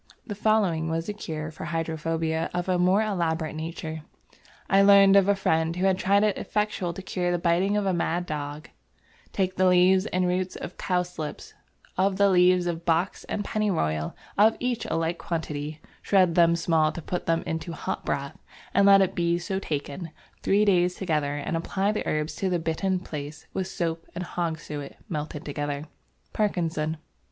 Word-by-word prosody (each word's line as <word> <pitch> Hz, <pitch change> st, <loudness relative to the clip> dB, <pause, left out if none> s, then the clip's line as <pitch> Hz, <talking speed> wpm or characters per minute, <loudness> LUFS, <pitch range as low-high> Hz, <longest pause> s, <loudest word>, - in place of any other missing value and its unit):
The 210 Hz, -, -5 dB
following 200 Hz, -6 st, +1 dB
was 165 Hz, 0 st, -2 dB
a -, -, -1 dB
cure 155 Hz, -6 st, -5 dB
for 155 Hz, -, -8 dB
hydrophobia 165 Hz, 0 st, -2 dB
of 180 Hz, 0 st, -2 dB
a 180 Hz, -1 st, +1 dB
more 185 Hz, +4 st, +4 dB
elaborate 165 Hz, -6 st, -1 dB
nature: 160 Hz, 0 st, -5 dB, 0.7 s
"I 195 Hz, 0 st, +5 dB
learned 195 Hz, 0 st, +7 dB
of 200 Hz, -1 st, +6 dB
a 200 Hz, -, +4 dB
Friend 160 Hz, -3 st, +1 dB
who 180 Hz, +2 st, 0 dB
had 190 Hz, -1 st, +2 dB
tried 200 Hz, +2 st, +3 dB
it 210 Hz, -3 st, +1 dB
effectual 210 Hz, -4 st, -1 dB
to 190 Hz, -, -8 dB
cure 180 Hz, -1 st, -1 dB
the 175 Hz, -, +1 dB
Biting 180 Hz, +4 st, +2 dB
of 205 Hz, -, 0 dB
a 190 Hz, -, +1 dB
Mad 175 Hz, +1 st, 0 dB
Dog; 150 Hz, -1 st, -5 dB, 0.6 s
take 185 Hz, -1 st, -1 dB
the 185 Hz, 0 st, +4 dB
Leaves 185 Hz, +2 st, +4 dB
and 185 Hz, -2 st, 0 dB
Roots 180 Hz, +1 st, -1 dB
of 180 Hz, -, -7 dB
Cowslips, 180 Hz, -4 st, -3 dB, 0.5 s
of 190 Hz, 0 st, +2 dB
the 200 Hz, 0 st, +5 dB
leaves 180 Hz, 0 st, +4 dB
of 170 Hz, -1 st, -3 dB
Box 170 Hz, +3 st, 0 dB
and 205 Hz, -, -3 dB
Pennyroyal 120 Hz, -, -1 dB, 0.2 s
of 220 Hz, +2 st, +5 dB
each 245 Hz, -2 st, -1 dB
a -, -, -2 dB
like 165 Hz, +1 st, -1 dB
quantity; 155 Hz, -2 st, -4 dB, 0.2 s
shred 185 Hz, -4 st, +3 dB
them 170 Hz, 0 st, +5 dB
small 165 Hz, -2 st, +2 dB
to 170 Hz, -, -6 dB
put 180 Hz, -, -4 dB
them 165 Hz, 0 st, +1 dB
into 160 Hz, +1 st, -3 dB
Hot 165 Hz, -, -4 dB
Broth 140 Hz, 0 st, -3 dB, 0.4 s
and 200 Hz, +1 st, +5 dB
let 195 Hz, 0 st, +8 dB
it 190 Hz, -, -1 dB
be 170 Hz, 0 st, +1 dB
so 190 Hz, +2 st, -3 dB
taken 155 Hz, 0 st, -4 dB, 0.3 s
Three 205 Hz, +2 st, +3 dB
Days 180 Hz, -2 st, +3 dB
Together 150 Hz, -6 st, -1 dB
and 145 Hz, +3 st, -3 dB
apply 190 Hz, +4 st, 0 dB
the 215 Hz, -, -3 dB
herbs 155 Hz, +1 st, -1 dB
to 190 Hz, -, 0 dB
the 180 Hz, -, +1 dB
bitten 180 Hz, +3 st, -1 dB
place 150 Hz, -2 st, -7 dB
with 190 Hz, -1 st, -2 dB
Soap 165 Hz, -3 st, -3 dB
and 180 Hz, -, -3 dB
Hog's 170 Hz, -2 st, -3 dB
suet 145 Hz, -2 st, -7 dB
melted 150 Hz, -1 st, -4 dB
together" 145 Hz, 0 st, -3 dB, 0.5 s
(Parkinson). 165 Hz, -6 st, -1 dB
175 Hz, 180 wpm, -26 LUFS, 160-190 Hz, 0.7 s, let